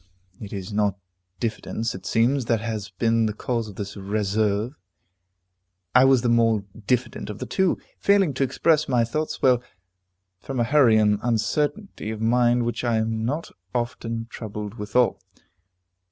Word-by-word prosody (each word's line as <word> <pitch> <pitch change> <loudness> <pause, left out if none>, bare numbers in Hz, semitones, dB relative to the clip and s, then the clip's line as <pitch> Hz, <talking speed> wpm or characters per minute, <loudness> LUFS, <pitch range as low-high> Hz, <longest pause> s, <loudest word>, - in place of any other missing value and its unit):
It 105 - -8
is 100 0 -6
not 105 -2 +1 0.4
diffidence, 115 0 -2
it 95 -1 -8
seems, 125 +3 +2
that 115 -1 +1
has 110 -3 -4
been 115 +3 +1
the 105 - -3
cause 115 -1 -2
of 100 - -11
this 100 0 -6
reserve; 105 +3 -1 1.2
I 125 +1 +7
was 135 -3 +4
the - - +2
more 115 -3 +3 0.2
diffident 125 -3 -1
of 105 - -5
the 130 - -5
two, 185 +10 +1 0.2
failing 200 -7 +3
to 135 - 0
express 150 +3 +2
my 125 -3 +3
thoughts 155 +7 -3
well, 125 -2 +5 0.8
from 135 +2 -5
a - - +3
hurry 125 -3 +5
and 105 -1 +3
uncertainty 125 - -1
of 110 -1 -4
mind 120 +1 +3
which 120 0 -2
I 120 -2 +2
am 110 0 -1
not 150 +7 -3 0.2
often 120 -2 -2
troubled 105 -2 -6
withal. 115 +2 +1
115 Hz, 155 wpm, -24 LUFS, 105-125 Hz, 1.2 s, I